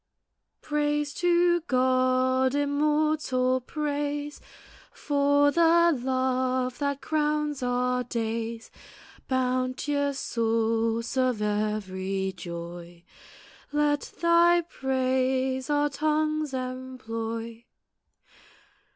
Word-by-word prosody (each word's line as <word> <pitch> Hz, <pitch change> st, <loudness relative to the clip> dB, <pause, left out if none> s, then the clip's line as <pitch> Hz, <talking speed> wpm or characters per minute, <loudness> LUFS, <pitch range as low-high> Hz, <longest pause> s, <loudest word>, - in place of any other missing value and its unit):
Praise 295 Hz, -1 st, -1 dB
to 345 Hz, 0 st, +3 dB
God, 255 Hz, 0 st, +2 dB
immortal 290 Hz, -3 st, +1 dB
praise, 290 Hz, +1 st, -3 dB, 0.5 s
For 285 Hz, 0 st, +2 dB
the 340 Hz, +1 st, +4 dB
love 255 Hz, 0 st, -1 dB
that 280 Hz, -1 st, -1 dB
crowns 300 Hz, -2 st, 0 dB
our 250 Hz, 0 st, 0 dB
days 230 Hz, -1 st, -4 dB, 0.6 s
Bounteous 260 Hz, +2 st, 0 dB
source 230 Hz, 0 st, 0 dB
of 255 Hz, -3 st, +1 dB
every 195 Hz, -2 st, -2 dB
joy, 170 Hz, 0 st, -8 dB, 0.7 s
Let 295 Hz, -1 st, 0 dB
Thy 340 Hz, +1 st, +5 dB
praise 260 Hz, -3 st, -1 dB
our 295 Hz, 0 st, +2 dB
tongues 305 Hz, -1 st, 0 dB
employ! 230 Hz, -3 st, -5 dB
260 Hz, 75 wpm, -27 LUFS, 235-295 Hz, 0.7 s, Thy